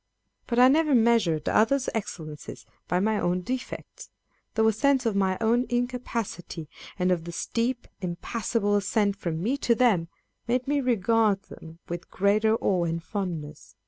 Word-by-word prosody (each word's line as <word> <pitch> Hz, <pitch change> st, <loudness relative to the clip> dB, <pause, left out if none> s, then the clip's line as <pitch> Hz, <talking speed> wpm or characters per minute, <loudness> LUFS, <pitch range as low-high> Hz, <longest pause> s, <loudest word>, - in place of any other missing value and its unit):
But 235 Hz, -, -2 dB
I 250 Hz, +1 st, +8 dB
never 300 Hz, +1 st, +4 dB
measured 220 Hz, -10 st, +3 dB
others' 255 Hz, +5 st, +3 dB
excellences 165 Hz, -9 st, -6 dB, 0.2 s
by 180 Hz, -, +1 dB
my 215 Hz, +2 st, +1 dB
own 180 Hz, +1 st, 0 dB
defects: 255 Hz, -, -6 dB, 0.5 s
though 220 Hz, 0 st, +3 dB
a 220 Hz, -, +4 dB
sense 270 Hz, +3 st, +2 dB
of 225 Hz, -3 st, +1 dB
my 190 Hz, -1 st, +1 dB
own 235 Hz, +2 st, +2 dB
incapacity, 240 Hz, -9 st, -3 dB, 0.3 s
and 180 Hz, -1 st, +1 dB
of 170 Hz, -2 st, 0 dB
the 170 Hz, -, -5 dB
steep, 235 Hz, +7 st, -2 dB
impassable 205 Hz, +4 st, -1 dB
ascent 205 Hz, 0 st, +1 dB
from 170 Hz, -4 st, -3 dB
me 255 Hz, +7 st, +1 dB
to 240 Hz, -4 st, +2 dB
them, 220 Hz, -9 st, +3 dB, 0.4 s
made 245 Hz, +2 st, 0 dB
me 285 Hz, 0 st, +1 dB
regard 225 Hz, -4 st, +2 dB
them 165 Hz, 0 st, -12 dB
with 175 Hz, 0 st, -6 dB
greater 215 Hz, +3 st, +2 dB
awe 185 Hz, -5 st, +1 dB
and 165 Hz, 0 st, -2 dB
fondness. 165 Hz, -8 st, -5 dB
215 Hz, 155 wpm, -26 LUFS, 180-240 Hz, 0.5 s, I